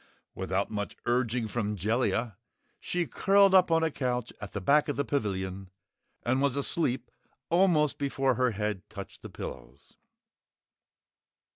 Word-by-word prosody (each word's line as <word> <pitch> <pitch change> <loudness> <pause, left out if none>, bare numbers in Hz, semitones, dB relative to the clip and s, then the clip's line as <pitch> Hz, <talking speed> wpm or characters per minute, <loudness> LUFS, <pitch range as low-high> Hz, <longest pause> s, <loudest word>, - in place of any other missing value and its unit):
Without 95 +3 -2
much 105 -1 -4
urging 120 -1 +1
from 105 -1 -2
Jellia, 115 +2 0 0.4
she 175 -1 -1
curled 195 +2 +4
up 185 -2 +6
on 165 0 +3
a 160 - +1
couch 125 -4 -2
at 100 - -6
the 100 - -3
back 145 +10 +3
of 145 - -1
the 140 - -1
pavilion 95 -6 -2 0.5
and 130 +2 +1
was 140 -2 +2
asleep 140 -2 0 0.4
almost 170 -5 +3
before 135 -2 +1
her 125 +1 +2
head 105 -3 -2
touched 100 -2 -9
the - - -8
pillows. - - -9
125 Hz, 140 wpm, -29 LUFS, 105-145 Hz, 0.5 s, up